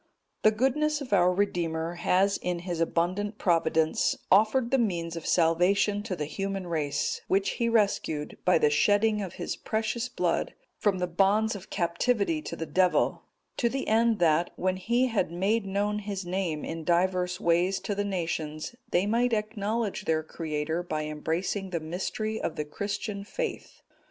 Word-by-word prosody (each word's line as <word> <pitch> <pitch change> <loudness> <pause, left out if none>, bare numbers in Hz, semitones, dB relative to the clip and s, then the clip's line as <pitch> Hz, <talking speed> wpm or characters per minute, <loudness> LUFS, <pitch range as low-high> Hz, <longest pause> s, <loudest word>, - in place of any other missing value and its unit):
_ - - -42 0.4
The 215 - +6
goodness 270 +7 +1
of 260 -7 -5
our 180 -2 +5
Redeemer 170 -4 -1
has 190 +3 +2
in 175 -1 -3
His 175 -3 -3
abundant 185 +6 0
Providence 160 -2 +2
offered 220 +5 +4
the 270 - +3
means 170 -7 -1
of 165 - -6
salvation 180 +5 +3
to 205 -3 -4
the 150 -3 -3
human 195 +4 -3
race, 155 -4 -1
which 195 +1 +2
He 235 -1 0
rescued, 200 -9 0
by 180 - +4
the 150 -2 +3
shedding 210 +7 +3
of 190 -3 -5
His - - -4
precious 220 +3 -2
Blood, 260 - -1 0.2
from 205 -3 +1
the 180 - 0
bonds 200 +5 +2
of 195 0 -9
captivity 210 - 0
to - - -6
the 165 - -4
Devil; 180 +4 +2 0.4
to 235 - +2
the 270 +2 -3
end 225 0 +3
that, 170 -1 +3
when 185 0 0
He 235 +7 +1
had 220 -9 0
made 195 +5 0
known 205 +2 0
His 200 -2 -5
name 175 -4 -2
in 165 0 -5
divers 180 +1 +1
ways 175 +3 +2
to 205 - -2
the 205 0 -1
nations, 165 0 -3
they 180 +3 +2
might 235 +3 +2
acknowledge 215 0 -2
their 155 -1 +1
Creator 160 +1 -3
by 155 -3 -3
embracing 165 +6 -2
the 170 -2 -2
mystery 190 +7 -3
of - - -2
the 150 - -3
Christian 200 +5 -4
faith. 475 - -5
190 Hz, 170 wpm, -28 LUFS, 170-215 Hz, 0.4 s, The